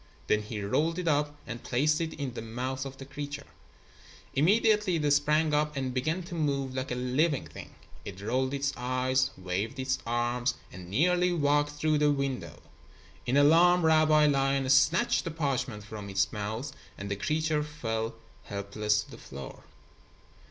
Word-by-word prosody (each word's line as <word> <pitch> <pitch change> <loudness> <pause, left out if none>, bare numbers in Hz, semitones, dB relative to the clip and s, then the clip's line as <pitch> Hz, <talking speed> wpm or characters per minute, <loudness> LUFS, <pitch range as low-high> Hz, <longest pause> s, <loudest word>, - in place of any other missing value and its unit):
Then 105 - +2
he 105 -1 -5
rolled 160 - 0
it 180 -2 -3
up 145 -1 +1
and 120 -1 -6
placed 150 +6 +1
it 165 -1 -2
in 140 -4 -4
the 115 - -5
mouth 130 +4 -4
of 135 0 -10
the 135 - -9
creature. 140 0 -6 0.9
Immediately 210 +4 +3
it 150 -3 +1
sprang 150 +2 +3
up 150 0 +1
and 130 -2 -2
began 155 +8 -1
to 175 +1 -9
move 140 -5 -1
like 130 +1 -3
a 125 - -2
living 130 +4 +1
thing. - - -11 0.3
It 95 -1 -8
rolled 130 +6 0
its 140 0 -1
eyes, 130 +1 +1
waved 95 +6 -3
its 130 0 -1
arms, 120 +1 0 0.2
and 90 0 -10
nearly 180 - +2
walked 145 -2 +2
through 150 0 +1
the 150 0 +4
window. 135 - -3 0.6
In 130 +3 +2
alarm, 165 +4 +5
Rabbi 155 -1 +5
Lion 135 -2 +2
snatched 140 +6 +4
the - - -3
parchment 135 -8 -2
from 105 -2 -8
its 95 +2 0
mouth 110 +6 -4 0.3
and 100 0 -6
the - - 0
creature 155 +8 0
fell 115 -7 -3 0.3
helpless 105 +1 -1
to - - -17
the - - -11
floor. 70 0 -10
135 Hz, 165 wpm, -29 LUFS, 120-150 Hz, 0.9 s, alarm